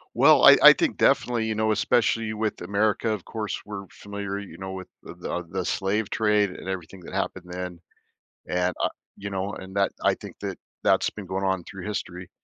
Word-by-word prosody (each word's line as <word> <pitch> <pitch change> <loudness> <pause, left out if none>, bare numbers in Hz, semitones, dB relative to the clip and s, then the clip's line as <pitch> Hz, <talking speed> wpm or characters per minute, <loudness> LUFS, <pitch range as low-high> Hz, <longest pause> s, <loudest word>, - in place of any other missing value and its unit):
Well, - - +6
I - - +10
I - - +12
think - - 0
definitely, 120 -2 +2
you 110 - -1
know, 110 0 +1
especially 110 +1 +2
with 110 0 -2
America, 105 +4 +1
of 105 -5 -3
course, 110 -2 -4
we're 100 -1 -7
familiar, 100 -1 -5
you 100 - -10
know, 95 0 -6
with 95 -1 -7
the, - - -7
uh 90 - -2
the 95 +1 -3
slave 100 +4 -1
trade 105 -2 +2
and 90 - -9
everything 95 0 -5
that 90 - -9
happened 95 -2 -3
then. 90 -1 -5 0.7
And, 90 0 0
uh, - - +3 0.3
you 100 0 -6
know, 95 +1 -3
and 95 +1 -10
that, 100 0 +2
I - - +4
think, - - -11
that - - -4 0.3
that's - - +4
been 100 -3 -9
going 95 +1 -2
on 95 -2 0
through 95 +1 -9
history. 90 -3 -5
100 Hz, 205 wpm, -25 LUFS, 95-105 Hz, 0.7 s, I